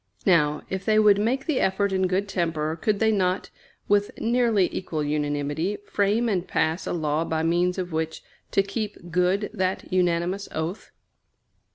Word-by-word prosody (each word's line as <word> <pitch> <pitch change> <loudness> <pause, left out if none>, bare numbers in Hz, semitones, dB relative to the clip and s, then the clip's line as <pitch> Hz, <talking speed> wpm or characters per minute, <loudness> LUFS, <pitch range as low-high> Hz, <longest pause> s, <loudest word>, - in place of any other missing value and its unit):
Now, 150 -5 +3
if 190 0 -4
they 215 0 +2
would 210 -2 +5
make 250 +6 0
the 305 -5 0
effort 195 +1 +1
in 190 -1 +2
good 190 +2 0
temper, 165 -4 -1
could 205 +5 0
they 220 +1 +3
not, 185 -2 0 0.4
with 205 0 +3
nearly 230 -5 +2
equal 160 -5 -3
unanimity, 145 +5 -1
frame 210 +4 +1
and 190 -5 -1
pass 160 +3 0
a - - -1
law 155 -2 0
by 160 -1 -1
means 175 +2 +1
of 180 -1 -3
which 160 0 -3 0.3
to 195 - +2
keep 200 -3 -5
good 180 +4 +1
that 185 -3 -2
unanimous 180 +2 0
oath? 160 +6 -4
185 Hz, 165 wpm, -25 LUFS, 165-205 Hz, 0.4 s, would